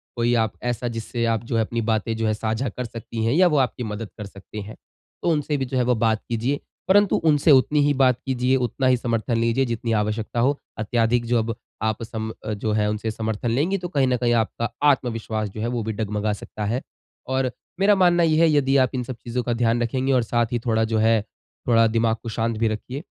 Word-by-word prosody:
कोई 120 0 +1
आप 110 - -3
ऐसा 120 0 -2
जिससे 115 +1 -2
आप 115 -1 0
जो 115 - -3
है 115 - +3
अपनी 115 +1 -2
बातें 110 +1 0
जो 110 0 0
है 110 - +2
साझा 110 +4 -2
कर 125 +4 -5
सकती 115 0 -5
हैं 115 - +2
या 180 +4 +5
वो 155 -4 +2
आपकी 125 -2 0
मदद 105 -1 -5
कर 105 - -6
सकती 100 +2 -9
हैं, 105 +2 -9 0.5
तो - - +1
उनसे 150 -1 0
भी 135 - -1
जो 130 +1 -3
है 125 - +3
वो 125 0 +2
बात 110 -1 +1
कीजिए, 120 +5 -1 0.3
परंतु 205 +1 +4
उनसे 155 -1 +3
उतनी 145 +2 +4
ही 145 - +3
बात 130 -3 +3
कीजिए, 130 0 +1
उतना 130 +1 0
ही 130 -1 +4
समर्थन 115 0 -1
लीजिए 115 +3 +2
जितनी 115 -1 -3
आवश्यकता 110 +2 -1
हो। 140 +4 +2 0.2
अत्याधिक 115 +2 +1
जो 120 +1 +1
अब 115 0 -2 0.3
आप 110 0 -1
सम 110 -1 -5 0.3
जो 110 - +1
है 105 -1 +1
उनसे 105 +1 -2
समर्थन 110 +1 -3
लेंगी 155 +11 +1
तो 180 -1 -5
कहीं 140 -6 +2
न 125 -1 +2
कहीं 120 -1 +1
आपका 115 +1 0 0.2
आत्मविश्वास 115 -5 0
जो 105 +2 -7
है 115 - -1
वो 120 - -1
भी 110 +1 -3
डगमगा 105 0 -1
सकता 105 +1 -6
है 120 +5 -1 0.5
और 130 -1 +1 0.3
मेरा 200 +1 +5
मानना 175 -2 +4
ये 155 -1 +3
है 165 - +5
यदि 140 -2 +2
आप 130 - 0
इन 125 - -1
सब 125 +1 -6
चीज़ों 120 +1 -4
का 120 - -1
ध्यान 115 0 +2
रखेंगे 130 +3 0
और 125 -2 +3
साथ 120 +1 +1
ही 120 - 0
थोड़ा 110 -1 +2
जो 110 0 0
है, 110 0 +3 0.5
थोड़ा 115 -2 +5
दिमाग 115 0 +1
को 115 - -5
शाँत 115 0 0
भी 115 - +2
रखिए 125 +7 -4
115 Hz, 235 wpm, -23 LUFS, 110-130 Hz, 0.5 s, या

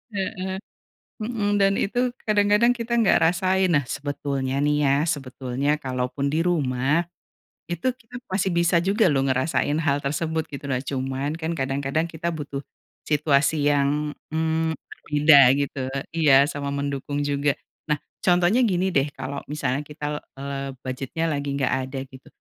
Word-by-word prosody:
Heeh, 190 -1 -3 0.7
mhm, 210 -3 0
dan 195 0 +4
itu 245 +4 0
kadang-kadang 210 +3 +4
kita 235 0 -3
enggak 220 - +5
rasain. 185 +1 +2
Nah, 145 -2 +3
sebetulnya 140 -2 -3
nih 150 0 +2
ya, 135 - +4 0.2
sebetulnya 135 -1 -2
kalaupun 130 +2 -2
di 155 +3 0
rumah, 150 0 +1 0.6
itu 175 +8 -3
kita 245 -1 -16 0.2
masih 190 0 +1
bisa 170 0 +3
juga 195 +2 +3
loh 135 -1 +1
ngerasain 130 +3 +1
hal 145 -2 +2
tersebut, 160 +2 -1
gitu. 140 0 -8
Nah, 125 - +1
cuman 135 +2 -3
kan 165 0 -3
kadang-kadang 135 +4 -1
kita 170 +1 -3
butuh 145 -3 -5 0.5
situasi 145 0 +2
yang, 145 +1 +1 0.2
mmm, 160 0 0
berbeda, 150 0 +4 0.2
gitu 140 -1 -2 0.4
iya, 140 -4 +6
sama 145 -1 -4
mendukung 140 0 -2
juga. 145 0 0 0.3
Nah, 150 - +2 0.2
contohnya 180 +7 +3
gini 190 -4 +1
deh, 140 +1 +2
kalau 135 +1 -5
misalnya 145 -2 -1
kita, 150 0 -5 0.2
eee, 140 0 -4 0.2
budget-nya 135 +5 -3
lagi 145 -2 -2
nggak 135 -3 +1
ada 135 0 -5
gitu, 130 0 -15
150 Hz, 145 wpm, -24 LUFS, 140-175 Hz, 0.7 s, iya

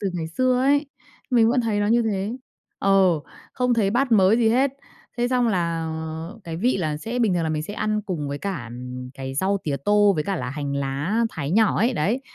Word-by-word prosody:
từ 200 - -1
ngày 170 -3 -3
xưa 255 +8 +1
ấy, 285 +2 +3 0.4
mình 230 -3 +5
vẫn 250 +2 +2
thấy 220 -3 0
nó 205 - +1
như 235 +3 +3
thế. 210 +1 -2 0.4
Ờ, 190 -5 +3 0.3
không 250 -1 +1
thấy 210 -4 +2
bát 250 +3 +1
mới 200 0 +5
gì 230 -2 +3
hết. 260 +4 +3 0.5
Thế 240 0 +1
xong 250 -2 +2
là 170 -5 -1 0.5
cái 165 -1 -5
vị 240 +7 +1
là 155 -5 -1
sẽ 230 +10 -4
bình 220 -6 +2
thường 175 - 0
là 160 - -1
mình 155 -1 -1
sẽ 205 +6 -6
ăn 215 0 -1
cùng 175 -8 -4
với 140 0 -4
cả, 190 -9 -4
ừm, 125 +1 -7
cái 135 -1 -6
rau 190 +7 +1
tía 145 -3 -1
tô 205 0 +5
với 150 - -1
cả 195 -1 -1
là 125 -6 -4
hành 140 0 -4
lá 140 +11 -1
thái 145 -3 -4
nhỏ 215 +3 +3
ấy, 235 +5 +2
đấy, 210 +9 0
195 Hz, 230 wpm, -23 LUFS, 155-230 Hz, 0.5 s, mình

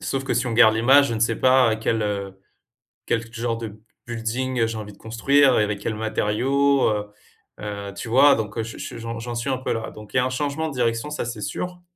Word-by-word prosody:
sauf 135 - -2
que 130 - -1
si 125 +1 0
on 115 - -2
garde 110 -1 +6
l'image, 135 +5 +5
je 115 - -2
ne 110 - -4
sais 115 0 +2
pas 130 -3 +4
quel, 110 0 -1
heu, 100 -2 -3 0.7
quel 115 0 -2
genre 115 0 -2
de 110 -2 -8 0.3
building 120 +1 -1
j'ai 115 0 -4
envie 105 -1 -7
de 100 - -20
construire 130 +4 +3
et - - +3
avec 105 -1 -3
quels 110 - -3
matériaux, 130 +6 +1
heu. 105 -1 -2 0.5
Heu, 100 -1 -5
tu 120 - -6
vois? 135 +5 +6
Donc 105 -1 -4
heu - - 0
j 115 - -8
ch - - -6
j'en 115 0 -5
j'en 120 +1 -5
suis 120 +3 -3
un 130 - 0
peu 130 - -2
là. 115 0 -4
Donc, 105 -1 -13
il - - +1
y - - +6
a 125 - +2
un - - 0
changement 145 +4 -2
de - - -7
direction 120 +2 0
ça, 150 - -3
c'est 120 -2 -6
sûr. 180 - -5
115 Hz, 245 wpm, -23 LUFS, 110-130 Hz, 0.7 s, garde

